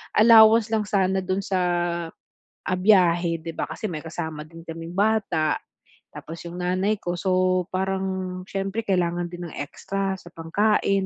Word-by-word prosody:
allowance 220 0 +7
lang 215 - +2
sana 190 -1 +1
dun 185 +1 -1
sa, 190 -1 -1 1.1
ah, 185 -1 0
biyahe 175 -4 +4
'di 165 +1 -6
ba, - - -2
kasi - - -4
may 155 -2 -5
kasama 160 -1 -5
din 165 +1 -13
kaming 165 +1 -7
bata, 195 -7 +1 0.6
tapos 165 +1 -8
'yong 170 - -8
nanay 185 +4 +1
ko, 175 0 -2
so 185 -1 +2
parang 190 -1 -2
siyempre 195 +3 -2
kailangan 175 -2 0
din 175 0 -7
ng - - -11
extra 195 +6 -3
sa 175 - -13
pangkain 195 +3 +1
185 Hz, 150 wpm, -24 LUFS, 170-195 Hz, 1.1 s, allowance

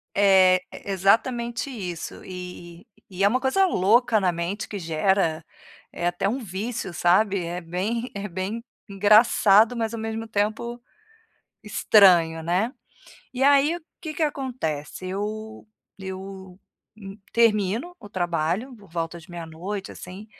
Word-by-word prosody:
É, 190 -2 +6 0.2
e - - -10
exatamente 235 +6 +1
isso. 180 -9 -6
E 180 -2 -9 0.3
e 185 - -12
e - - +2
é - - +7
uma 255 +5 +1
coisa 380 +9 +3
louca 230 - +3
na 180 -2 +2
mente, 175 +5 -4
que 205 - -5
gera, 165 0 +1 0.5
é 175 - -2
até 185 +3 0
um 260 +4 -2
vício, 205 -1 -5
sabe, 190 +2 +2
é 175 +1 -4
bem 205 +9 -3
é 200 +1 -4
bem 190 +6 -4 0.3
engraçado, 210 +2 +5
mas 225 -1 -2
ao 230 - -4
mesmo 225 0 -4
tempo, 220 +3 -2 0.8
estranho, 180 -6 +4
né. 185 +9 0 0.6
E 260 +1 -3
aí, 285 +4 +5
o - - -10 0.2
que 315 -3 -6
que 325 - -2
acontece, 235 - -3
eu 215 +3 -5 0.3
eu, 190 -1 -8 0.4
hum, 195 -1 -10 0.2
termino 230 - +2
o 205 - -11
trabalho 175 - -2
por 200 -5 -18
volta 165 0 -4
de 175 +3 -16
meia 170 -1 -7
noite, 190 +5 -6
assim, 190 +4 -10
200 Hz, 145 wpm, -24 LUFS, 180-230 Hz, 0.8 s, é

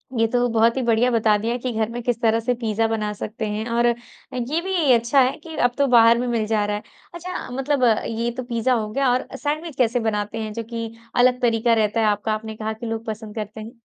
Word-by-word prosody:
ये 225 -1 +3
तो 245 0 +3
बहुत 230 +2 +3
ही - - +1
बढ़िया 235 +1 +3
बता 220 -2 +3
दिया 230 +3 -2
कि 250 +1 -3
घर 220 0 0
में 240 +1 -5
किस 240 -1 -1
तरह 225 -1 +3
से 240 +2 0
पिज़्ज़ा 225 -1 0
बना 215 -2 -1
सकते 220 +2 -5
हैं 210 +1 -3
और 235 +1 +2
ये 245 +4 -3
भी 350 -6 +1
अच्छा 235 +4 +3
है 255 +1 +1
कि 320 +1 -10
अब 245 - +2
तो 280 -1 +3
बाहर 235 -2 +6
में 250 - -1
मिल 230 -3 0
जा 215 -1 +1
रहा 205 0 -1
है। 210 - -6 0.3
अच्छा, 350 -2 -6
मतलब 270 +1 0 0.2
ये 230 +1 -2
तो 255 - -3
पिज़्ज़ा 240 +1 0
हो 220 -3 -1
गया 270 +2 +1
और 250 - 0
सैंडविच 305 +2 -3
कैसे 245 -1 +2
बनाते 215 -1 -2
हैं 215 -1 -5
जो 230 - -4
कि 230 -1 -4 0.3
अलग 250 0 +4
तरीका 230 -1 +2
रहता 220 0 +1
है 225 - +3
आपका 210 +1 0
आपने 220 0 -5
कहा 220 0 -3
कि 220 +2 -9
लोग 225 0 -4
पसंद 215 -1 -6
करते 215 0 -5
हैं? 230 +2 -11
230 Hz, 245 wpm, -22 LUFS, 220-250 Hz, 0.3 s, बाहर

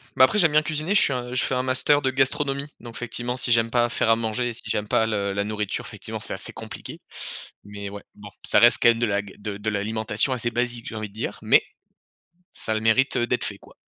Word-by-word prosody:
Bah, 130 - +6
après 210 - -1
j'aime 165 -6 +4
bien 155 +1 +5
cuisiner, 155 +5 -1
je - - +5
suis 135 - +2
un 125 0 -4
je 125 - +1
fais 130 - -1
un 125 - 0
master 130 +3 +2
de 130 - +2
gastronomie. 140 +1 0
Donc 115 -1 -10
effectivement 120 +1 -4
si 125 -1 -1
j'aime 115 0 +3
pas 120 -1 +3
faire 115 - 0
à 115 - +6
manger, 115 +2 -1
et - - -5
si - - -8
j'aime 105 0 -1
pas 110 +1 +2
le 100 -2 -1
la 100 +1 0
nourriture 105 -1 -3
effectivement - - -7
c'est - - -5
assez - - -6
compliqué, - - -9 0.6
mais 100 -1 -6
ouais. 100 0 -9
Bon, 105 0 -11
ça - - +4
reste 120 0 +7
quand - - +7
même 115 0 +3
de 120 - +2
la 100 -2 0
ga 100 -2 -12
de 105 -1 -5
de 105 +2 -2
l'alimentation 110 +4 0
assez 120 -1 -2
basique 120 -1 -2
j'ai 110 - -6
envie 110 -1 -4
de 100 - -20
dire, 110 - -4
mais - - +5 1.0
ça 110 - +1
a - - 0
le 110 - -1
mérite, 120 +5 +3
heu, 120 - +2
d'être 125 - 0
fait 100 -2 -5
quoi. - - -18
115 Hz, 265 wpm, -24 LUFS, 105-130 Hz, 1.0 s, reste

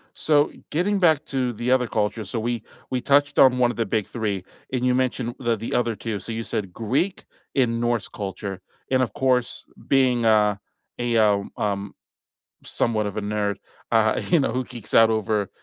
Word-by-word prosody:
So 150 -1 +3 0.2
getting 195 +5 +1
back 160 -4 +4
to 130 -3 -1
the 120 +3 -1
other 125 -2 +2
culture, 110 +1 -1
so 100 +4 -1
we 115 0 -2 0.3
we 130 - -1
touched 145 +2 +2
on 130 -2 +6
one 120 -1 +3
of - - -13
the 115 - 0
big 105 0 -1
3 105 -5 -3 0.3
and 125 -1 -1
you 125 - +3
mentioned 125 -2 -1
the 120 -2 +1
the 115 +2 -5
other 120 -2 0
2, 110 -3 -4
so 105 - -5
you 115 0 -3
said, 95 -5 -2
"Greek 130 - -1 0.3
and 115 -3 +2
Norse 120 -3 0
culture," 100 -1 -6 0.3
and, 130 -1 +3
of 115 -5 -1
course, 125 -2 +2 0.2
being, 130 -3 +3
uh, 105 -2 +4 0.5
a, 120 -1 0
uh 105 -2 +4 0.2
um, 100 -1 -2 0.7
somewhat 110 -2 0
of 100 - -4
a - - -1
nerd, 105 0 -1 0.4
uh, 110 -1 +3
you 170 - +5
know, 135 - +1
who 130 +2 -2
geeks 120 -4 -6
out 115 0 +7
over, 110 -2 0
115 Hz, 190 wpm, -23 LUFS, 105-130 Hz, 0.7 s, out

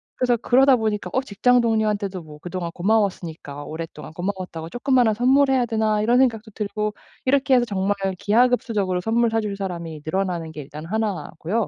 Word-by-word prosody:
그래서 245 -2 +2
그러다 260 +3 +5
보니까 210 -4 -2
'어 260 - +2
직장 250 +1 +2
동료한테도 210 -5 0
뭐 150 -2 -12
그동안 175 0 -4
고마웠으니까 175 -7 -1
오랫동안 160 -1 -7
고마웠다고 180 -3 -5
쪼끄만한 245 -2 +2
선물해야 265 +1 +3
되나.' 220 -2 +1
이런 240 +3 +3
생각도 225 -4 +1
들고 210 0 -3 0.3
이렇게 270 0 +3
해서 245 -1 +3
정말 200 -1 0 0.2
기하급수적으로 215 -5 +2
선물 230 +3 +2
사줄 210 -3 -1
사람이 170 -5 -5
늘어나는 175 -2 -2
게 150 - -6
일단 150 +3 -9
1 205 -5 -2
고요. 210 +7 -1
210 Hz, 425 characters per minute, -23 LUFS, 180-235 Hz, 0.3 s, 그러다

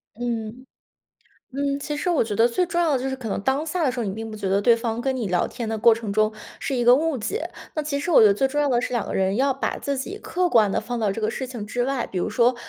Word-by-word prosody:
嗯。 235 +1 -4 0.9
嗯， 280 +1 -1
其 295 +1 -4
实 355 +4 -1
我 330 - +3
觉 210 -2 -3
得 230 +3 +4
最 360 +9 0
重 345 -1 -2
要 330 -4 +3
的 265 - +2
就 270 - -1
是 265 - -2
可 235 -4 -6
能 200 - -2
当 265 +7 0
下 330 +2 -2
的 260 - +3
时 250 - -6
候， - - -1
你 195 - -2
并 225 +1 -6
不 215 - -7
觉 200 -2 -4
得 195 +1 +2
对 235 +2 +5
方 230 0 -3
跟 265 +1 -1
你 225 -6 -2
聊 175 -1 +1
天 235 - -6
的 220 0 -2
过 230 +1 +6
程 220 -3 -5
中 215 +1 +2 0.3
是 270 - -3
一 240 -1 0
个 245 +1 +8
误 320 -1 0
解。 395 - -3 0.3
那 305 - -1
其 285 -1 -2
实 350 - -3
我 310 - +7
觉 215 - +8
得 200 - +5
最 270 +6 +2
重 295 +2 -1
要 290 - +2
的 240 -2 +2
是， 250 - -4
两 235 - -1
个 - - -4
人 190 +1 +1
要 270 0 +2
把 270 - -2
自 280 -1 -2
己 390 +11 -5
客 360 -3 -1
观 215 -4 +4
地 - - 0
放 240 +2 -4
到 210 -2 +1
这 225 - -5
个 215 +1 0
事 260 - -4
情 240 -5 -6
之 245 +3 -2
外， 270 -2 -1
比 185 - -3
如 - - -1
说， 235 +3 +3
245 Hz, 340 characters per minute, -23 LUFS, 220-280 Hz, 0.9 s, 个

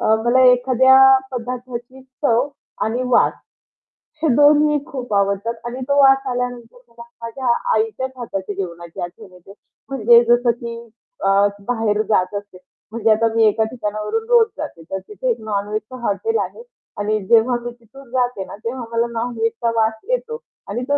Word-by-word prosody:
अ, 220 - +3
मला 245 +2 +4
एखाद्या 260 +1 +4 0.3
पदार्थाची 250 +1 -6 0.2
चव 250 0 +2 0.4
आणि 235 +3 -1
वास 250 - +3 0.9
हे - - +3
दोन्ही 295 +1 +5
खूप 255 -7 -6
आवडतात 200 +3 0
आणि 245 +2 -5
तो 280 - +1
वास 270 0 +6
आल्यानंतर 245 -1 -4
मला 235 0 -13 0.2
माझ्या 240 +3 -5 0.3
आईच्याच 425 -13 -1
हाताची 205 -4 -5
जेवणाची 170 -3 -7
आठवण 185 +3 -8
येते 180 +2 -15 0.4
म्हणजे 235 -2 +5
जसं 240 0 +4
की 235 -1 -5 0.5
अ, - - +3 0.4
बाहेर 225 -3 0
जात 185 -2 +1
असते. 205 -2 -7 0.3
म्हणजे 225 0 +1
आता 225 +1 +3
मी 225 - +4
एका 220 0 +3
ठिकाणावरून 215 - -3
रोज 475 -2 +6
जाते, 290 - -7
तर 190 - -2
तिथे - - -4
एक 475 - 0
नॉन-व्हेजचं 215 +2 -3
हॉटेल 450 - -1
आहे - - -6 0.4
आणि 210 +1 0
जेव्हा 235 +2 +4
मी 240 0 -5
तिथून 240 +2 -17
जाते 245 -5 -1
ना, - - -9
तेव्हा 245 +2 -3
मला 230 0 +1
नॉन-व्हेज 230 0 -2
वास 220 0 +2 0.2
येतो 485 -2 -2 0.3
आणि 235 +5 -3
तो 285 - +3
235 Hz, 155 wpm, -20 LUFS, 215-260 Hz, 0.9 s, वास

